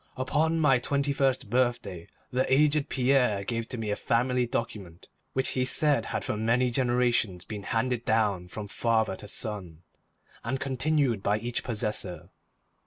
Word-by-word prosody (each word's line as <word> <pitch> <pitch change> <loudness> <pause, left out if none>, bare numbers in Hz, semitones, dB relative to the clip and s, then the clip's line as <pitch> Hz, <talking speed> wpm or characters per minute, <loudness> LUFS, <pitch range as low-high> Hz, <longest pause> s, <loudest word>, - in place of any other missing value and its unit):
Upon 155 +5 +1
my 140 -5 +4
twenty 140 +3 0
first 135 -4 0
birthday, 120 -8 -1 0.2
the 130 +1 0
aged 150 +1 +3
Pierre 125 -6 +2
gave 115 +2 -3
to 125 - -5
me 110 -2 -3
a - - 0
family 125 +2 +1
document 100 -8 -5 0.3
which 130 0 0
he 130 - 0
said 145 +2 +3
had - - -3
for - - -2
many 115 +3 +1
generations 120 -7 +1
been 105 -2 -6
handed 120 +3 -1
down 105 -6 +1
from 105 +3 -7
father 110 +1 0
to 105 - -10
son, 95 -7 -5 0.6
and 130 +4 -2
continued 135 -4 0
by 105 +1 +1
each 120 +2 -3
possessor. 105 -5 -1
120 Hz, 155 wpm, -28 LUFS, 105-130 Hz, 0.6 s, my